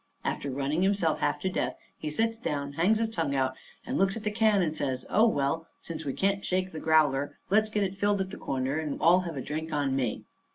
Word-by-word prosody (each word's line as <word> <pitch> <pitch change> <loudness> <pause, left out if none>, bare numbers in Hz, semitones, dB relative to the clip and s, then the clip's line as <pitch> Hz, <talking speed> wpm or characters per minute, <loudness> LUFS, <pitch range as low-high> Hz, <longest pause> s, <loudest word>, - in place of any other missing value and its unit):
After 140 - -2
running 140 +5 -1
himself 190 -5 +2
half - - 0
to 190 - 0
death, - - -1 0.2
he 155 - -5
sits 225 +8 0
down, 140 - -3
hangs 180 +9 +3
his 225 0 +1
tongue 160 -8 -1
out, 130 -1 +1 0.3
and - - -2
looks 195 +2 +2
at 220 - -7
the 210 - 0
can 210 -3 +3
and 155 -2 -1
says: 130 -4 -2
"Oh, 220 +2 +5
well, 160 -2 0
since 160 -1 -7
we 135 - -1
can't 195 +4 0
shake 185 0 0
the 160 - -6
growler, 150 -3 +2
let's 215 +1 +4
get 210 -1 0
it 195 0 -3
filled 205 0 +2
at 190 0 -2
the - - -7
corner, 135 +2 -1
and 155 -3 -3
all 175 +3 +6
have 170 -5 -5
a - - -2
drink 155 +4 -4
on 140 -3 0
me." 125 -5 -1
165 Hz, 240 wpm, -28 LUFS, 140-195 Hz, 0.3 s, all